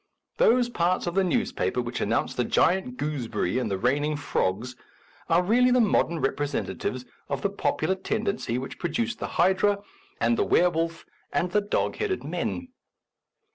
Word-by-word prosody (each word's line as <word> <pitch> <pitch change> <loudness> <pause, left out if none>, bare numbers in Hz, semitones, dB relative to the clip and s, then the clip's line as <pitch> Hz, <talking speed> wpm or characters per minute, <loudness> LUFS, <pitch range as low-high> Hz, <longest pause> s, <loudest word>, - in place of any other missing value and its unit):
Those 245 +1 +4
parts 180 -6 0
of 175 - -2
the 195 +1 +3
newspaper 180 - 0
which 120 0 -3
announce 115 +3 0
the 125 - 0
giant 190 - +1
gooseberry 130 -7 -1
and 120 -4 -2
the 100 - -1
raining 145 +7 +1
frogs 120 -3 -1 0.5
are 170 +2 +4
really 245 +6 +4
the 250 0 +4
modern 190 -6 +2
representatives 135 -2 -2 0.2
of 140 -1 -3
the 200 - +1
popular 195 -1 0
tendency 200 - -2
which 130 +1 -6
produced 225 +8 -2
the - - -3
hydra 190 +4 +3 0.4
and 115 0 +2
the - - +4
were 180 0 +4
wolf 165 0 -2 0.3
and 180 - 0
the 210 - +3
dog 205 - -1
headed 410 -4 -1
men. 260 -1 -3
170 Hz, 160 wpm, -26 LUFS, 130-205 Hz, 0.5 s, Those